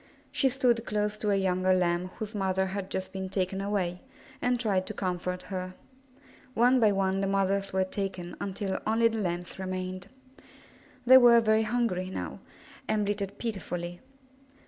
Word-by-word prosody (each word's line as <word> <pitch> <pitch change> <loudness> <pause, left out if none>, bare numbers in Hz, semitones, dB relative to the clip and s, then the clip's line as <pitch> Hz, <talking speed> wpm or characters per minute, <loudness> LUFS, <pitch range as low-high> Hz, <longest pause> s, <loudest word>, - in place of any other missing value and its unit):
She 270 - +2
stood 245 -3 +2
close 210 -1 -1
to 210 - -1
a 200 - +3
younger 185 -1 +2
Lamb 175 0 +1
whose 215 0 -5
mother 190 -2 0
had 190 0 -4
just 190 0 -4
been 190 -1 -4
taken 190 0 -1
away, 190 -3 -1 0.4
and 245 0 +1
tried 200 -5 0
to 215 - -5
comfort 180 -1 -3
her. 185 0 -4 0.8
One 250 +2 +5
by 215 -3 +5
one 195 -1 +1
the 195 - 0
mothers 195 0 +1
were 190 0 +2
taken 185 -2 -4
until 195 0 -2
only 230 +1 +4
the 225 0 -3
Lambs 175 -1 -3
remained. 185 -1 -4 1.0
They 260 +1 +9
were 240 -1 +7
very 220 -1 +3
hungry 215 -5 0
now, - - -5 0.5
and 215 -1 +1
bleated 200 -1 -3
pitifully. 175 -6 -4
195 Hz, 160 wpm, -29 LUFS, 185-215 Hz, 1.0 s, They